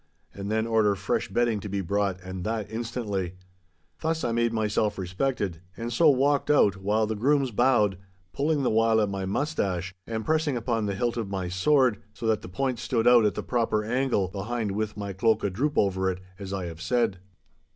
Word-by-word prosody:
And 100 0 -6
then 110 +1 +1
order 110 -3 +3
fresh 100 -1 -1
bedding 115 +1 +1
to 105 - -7
be 100 0 -1
brought, 100 0 -1
and 95 0 -6
that 110 0 -3
instantly. 110 -6 -3 0.6
Thus 160 0 -1
I 120 - 0
made 115 0 +1
myself 105 -1 0
respected, 95 -1 -2 0.2
and 120 +1 -4
so 160 +5 +5
walked 140 +1 +2
out, 105 -10 +4
while 105 +3 +1
the 110 - -2
grooms 135 +3 +2
bowed, 105 -5 +3 0.3
pulling 145 0 +1
the - - +2
while 115 0 +3
at 105 -2 +1
my 95 -1 -3
moustache 95 - -1
and 110 -1 -3
pressing 155 -4 +1
upon 115 -2 -1
the 100 - -2
hilt 120 +4 -1
of 110 -4 -3
my 95 -2 -3
sword, 125 +5 +3
so 115 - -6
that 110 -1 +2
the - - -9
point 130 +5 -1
stood 120 -1 0
out 120 -2 +7
at 105 - +1
the - - -3
proper 115 -3 0
angle 120 -3 +1
behind 105 +2 -3
with 105 +1 -3
my 100 -1 -4
cloak 110 +4 +2
a 100 - 0
droop 145 +10 -1
over 95 -1 +2
it, 90 -1 -3 0.2
as 100 -1 -6
I 95 -2 -3
have 85 -1 -8
said. 100 +1 +1
110 Hz, 205 wpm, -27 LUFS, 100-120 Hz, 0.6 s, out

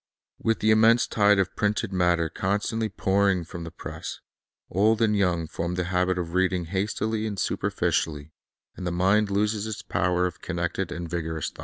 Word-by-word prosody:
With 115 0 0
the 110 - +4
immense 110 +2 +5
tide 105 -1 +3
of 95 -1 0
printed 105 -1 0
matter 90 -2 +2
con 95 +5 0
stantly 110 +1 -2
pouring 95 -2 +2
from 85 +1 -8
the - - -6
press, 85 - -7 0.5
old 105 +4 +2
and 110 -2 +3
young 90 -5 +1
form 85 +3 -3
the 90 - 0
habit 90 +1 0
o( - - +1
reading 90 +1 0
hastily 105 +4 -1
and 105 -2 -4
superficially, 75 -4 -1 0.4
and 90 - -5
the - - -1
mind 95 +4 +2
loses 105 +1 0
its 110 -1 -5
power 90 -1 +1
of 90 - -5
connected 85 +1 -2
and 85 0 -5
vigorous 80 -2 -3
thought. - - -21
95 Hz, 180 wpm, -26 LUFS, 85-105 Hz, 0.5 s, immense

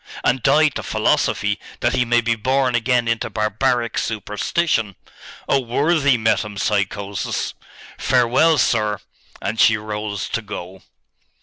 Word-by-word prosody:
'And 130 +1 +1
die 150 +5 +4
to - - -6
philosophy, - - 0 0.2
that - - +1
he 125 - +1
may 120 0 +3
be 115 0 +1
born 130 +3 0
again 120 0 +1
into 115 0 -1
barbaric 115 +3 0
superstition! 110 - -1 0.5
Oh 140 - +3
worthy 140 +2 +2
metempsychosis! 100 -2 -1 0.5
Farewell, 130 +5 +3
sir!' 105 -4 +1 0.5
And 105 +3 -3
she 115 - +5
rose 105 -3 -4
to 115 - -2
go. 95 -3 -8
115 Hz, 120 wpm, -20 LUFS, 105-130 Hz, 0.5 s, she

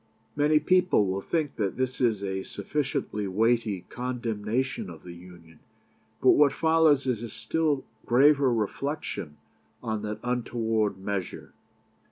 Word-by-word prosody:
" - - -39
Many 150 +1 +3
people 180 - +3
will 95 +1 -2
think 155 - -2
that 100 -4 -1
this 130 0 -2
is 110 -5 +1
a 95 -1 -2
sufficiently 105 -1 -3
weighty 110 0 +1
condemnation 120 0 -3
of 80 -3 -11
the 90 - -9
Union, 85 -2 -15 0.6
but - - +6
what 145 -2 +5
follows 160 -4 +3
is 125 -4 -1
a 120 - -5
still 155 -1 -1 0.2
graver 140 +2 +5
reflection 110 - -3 0.5
on 110 -1 -2
that 105 0 -4
untoward 115 -4 -1
measure. 95 -1 -5
115 Hz, 135 wpm, -27 LUFS, 100-140 Hz, 0.6 s, but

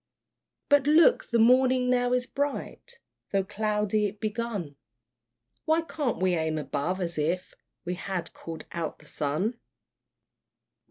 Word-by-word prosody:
But 285 -1 +4
look, 335 +11 +5
the 235 - +2
morning 255 +2 +4
now 245 0 +2
is 250 0 +1
bright, 285 - -4 0.3
Though 195 -1 +2
cloudy 210 +1 0
it 205 +1 -9
begun: 215 -8 -3 0.9
Why 320 +1 +3
can't 300 -5 -2
we 185 -1 +2
aim 160 -2 0
above, 155 +5 -2
as 170 -3 -3
if 175 +5 -1 0.3
We 180 - -2
had 185 -1 -4
called 165 -1 -8
out 165 -2 -4
the 150 - -19
sun? 155 - -2
210 Hz, 130 wpm, -27 LUFS, 175-250 Hz, 0.9 s, look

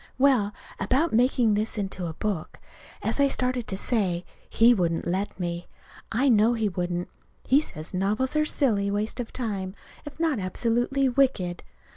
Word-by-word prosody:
Well, 255 -7 +3 0.3
about 265 - +1
making 240 -1 +3
this 215 +2 -1
into 190 -3 -3
a 160 - -6
book. 195 -6 -3 0.4
As - - -1
I 280 - +5
started 250 -3 -1
to 190 - -2
say, 190 -6 0 0.2
he 235 +2 +5
wouldn't 170 -6 0
let 190 +3 -2
me. 175 -1 -3 0.4
I 250 +5 +2
know 225 -1 +5
he 220 -2 0
wouldn't. 175 -1 -2 0.4
He 275 +3 +4
says 160 - -7
novels 210 +9 0
are 305 - +4
a 305 - +1
silly 210 -11 +1
waste 210 +4 -2
of 240 - -4
time, 200 -6 -3 0.3
if 295 +2 -10
not 320 -7 +1
absolutely 240 +8 +1
wicked. 240 -10 +1
215 Hz, 165 wpm, -26 LUFS, 190-255 Hz, 0.4 s, I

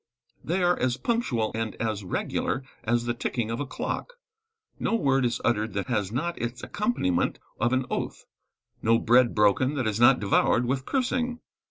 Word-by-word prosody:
They 180 +3 0
are 175 0 +3
as 125 -1 +1
punctual 130 - 0
and 110 -2 -3
as 110 -3 -2
regular 115 +7 -2 0.2
as 120 +1 +1
the 120 - 0
ticking 120 -1 -2
of 115 - -3
a 145 - -3
clock. - - -4 0.7
No - - +1
word 135 - +2
is 115 -1 0
uttered 110 -2 +1
that 100 +5 -3
has 105 -5 0
not 170 +8 -2
its 120 +1 -4
accompaniment 205 - 0 0.2
of 120 - +2
an 130 0 +1
oath; - - -3 0.6
no 115 +1 +4
bread 120 +1 +4
broken 105 +7 +3
that 130 -3 -1
is 110 0 -1
not 125 +2 +6
devoured 105 +4 +2
with 130 +2 -2
cursing. 250 -2 0
120 Hz, 175 wpm, -26 LUFS, 110-140 Hz, 0.7 s, not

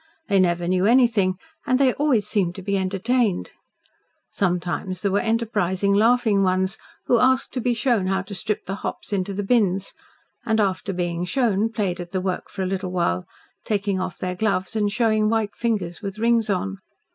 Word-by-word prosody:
They 200 -1 +4
never 175 -1 +1
knew 185 +2 +2
anything, 230 -6 +4 0.3
and 255 - +3
they 265 -2 +3
always 275 -8 +1
seemed 185 -5 0
to 190 - -8
be 200 +1 -1
entertained. 195 +3 0 0.8
Sometimes 180 0 -2
there 200 - +1
were 200 - +2
enterprising, 210 -4 0
laughing 220 -1 +3
ones, 190 +2 +1 0.3
who 240 - +3
asked 260 +2 +2
to 255 - -2
be 245 0 +1
shown 225 -4 +1
how 190 0 0
to 200 +1 -9
strip 205 +2 -3
the 195 - -4
hops - - -5
into 195 0 -1
the 200 +1 -3
bins, 195 -3 +1 0.5
and 220 -1 +1
after 195 -1 0
being 175 -2 -2
shown 225 -1 +1
played 195 -6 -2
at 175 +1 -8
the 190 - +1
work 185 -1 -3
for 195 - -4
a - - -1
little 185 0 -3
while, 130 - 0 0.4
taking 200 -3 -1
off 185 -1 -4
their 185 0 -3
gloves 190 0 -1
and 210 -2 +1
showing 215 -1 +2
white 220 -2 0
fingers 200 -8 -2
with 200 -1 -5
rings 230 -1 +2
on. 95 - -1
200 Hz, 185 wpm, -23 LUFS, 185-225 Hz, 0.8 s, They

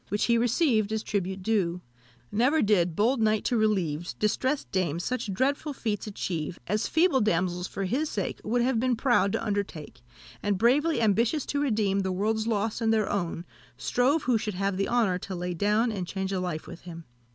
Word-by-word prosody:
Which 205 - 0
he 235 - +3
received 235 - +2
as 220 0 -1
tribute 190 -1 -2
due 185 -5 0 0.5
Never 255 +9 +3
did 180 -6 +2
bold 230 +5 +2
knight 215 -1 +2
to 245 - +1
relieve 185 -7 0
Distressed 260 +7 0
dames, 170 -3 -1
such 250 -3 -2
dreadful 280 +8 0
feats 215 -5 -3
achieve, 175 -5 -4
As 210 +3 0
feeble 320 -4 +3
damsels 180 -2 0
for 195 - -4
his 265 +11 -1
sake 200 - -3
Would 240 +2 +1
have 250 -2 +1
been 255 +1 +1
proud 235 -4 +2
to - - -1
undertake, 190 - -4 0.4
And, 205 -1 0
bravely 275 - +3
ambitious 230 +7 +2
to 285 - -1
redeem 210 -7 +1
The 190 -1 -1
world's 215 +4 0
loss 220 +1 -1
and 225 -1 +2
their 220 -2 +1
own, 175 -3 -2 0.3
Strove 275 +6 +1
who 240 -3 +2
should 210 -2 -4
have 195 +1 -1
the 195 +1 -1
honour 220 -7 +2
to 190 0 -6
lay 180 0 -3
down, 210 +6 +1
And 190 -4 -4
change 190 0 -3
a 190 - -1
life 175 -4 -3
with 175 - -10
him." 170 -1 -9
210 Hz, 195 wpm, -27 LUFS, 185-235 Hz, 0.5 s, he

